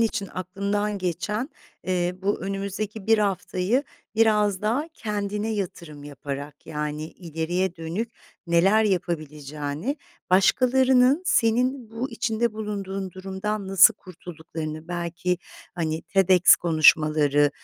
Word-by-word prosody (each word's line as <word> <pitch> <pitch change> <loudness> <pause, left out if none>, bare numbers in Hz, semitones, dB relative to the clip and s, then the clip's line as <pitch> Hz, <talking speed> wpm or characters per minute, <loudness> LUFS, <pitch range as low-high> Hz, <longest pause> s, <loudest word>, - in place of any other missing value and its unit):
için 225 -3 0
aklımdan 200 +3 -2
geçen, 190 - -2 0.4
eee, 180 -1 0
bu 205 +1 0
önümüzdeki 200 +2 -4
1 225 0 +5
haftayı 200 +3 0 0.3
biraz 210 -3 +3
daha 250 +9 0
kendine 210 -1 -3
yatırım 170 -7 -6
yaparak, 145 0 -7
yani, 150 0 -4
ileriye 175 +2 -3
dönük 175 +8 -4 0.3
neler 190 +6 +4
yapabileceğini, 155 - -3 0.3
başkalarının 255 - +4
senin 250 -2 +1
bu 235 +4 -4
içinde 230 0 -1
bulunduğun 195 -3 -4
durumdan 195 +2 -4
nasıl 195 +3 +7
kurtulduklarını 160 -4 -8
belki, 175 +1 -2 0.4
hani, 160 -2 -2
TEDx 185 -2 +5
konuşmaları, 155 -3 +4
190 Hz, 100 wpm, -25 LUFS, 165-215 Hz, 0.4 s, nasıl